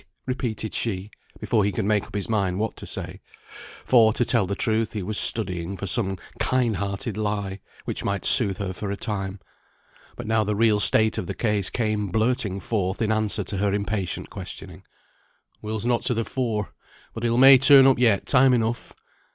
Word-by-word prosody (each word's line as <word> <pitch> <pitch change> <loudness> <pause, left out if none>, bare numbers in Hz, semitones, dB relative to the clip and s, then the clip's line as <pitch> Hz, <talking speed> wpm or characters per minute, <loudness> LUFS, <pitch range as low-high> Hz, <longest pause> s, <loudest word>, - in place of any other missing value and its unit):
repeated 115 -4 -4
she, 100 -2 -3 0.3
before 110 -3 0
he 100 - 0
could 95 - -3
make 105 -1 +1
up - - -13
his 100 - -3
mind 100 -5 -1
what 110 +1 -3
to - - -10
say; - - -7 0.6
for, 115 -3 +5
to 120 +2 -1
tell 115 -6 +1
the 100 - -3
truth, 110 -1 -1
he 105 -3 -4
was 105 +4 -4
studying 95 -4 0
for 100 - -5
some 95 0 +3 0.2
kind 120 -5 0
hearted 100 +3 -4
lie 105 -2 -3 0.3
which - - -4
might 100 -2 -2
soothe 100 -6 +6
her 95 -2 -4
for 100 +2 -6
a 100 - -4
time. 100 -2 -4 0.8
But - - -8
now 110 0 +1
the 105 0 -2
real 110 -1 +2
state 110 +1 +2
of 90 - -5
the - - -5
case 105 -4 -1
came 110 -3 -2
blurting 110 -1 -1
forth 95 -3 -2
in 110 -1 0
answer 110 -1 0
to 100 +2 -4
her 100 +1 0
impatient 100 -2 -3
questioning. - - -9 0.8
"Will's 110 0 -5
not 120 -1 +1
to 125 - 0
the 115 0 -2
fore. 115 -6 -3 0.4
But 115 - -7
he'll 120 0 0
may 135 +1 +8
be - - -7
turn 135 0 +7
up 135 -2 +4
yet, 110 -6 +2
time 130 -1 +4
enough." 115 0 -3
105 Hz, 195 wpm, -23 LUFS, 100-115 Hz, 0.8 s, may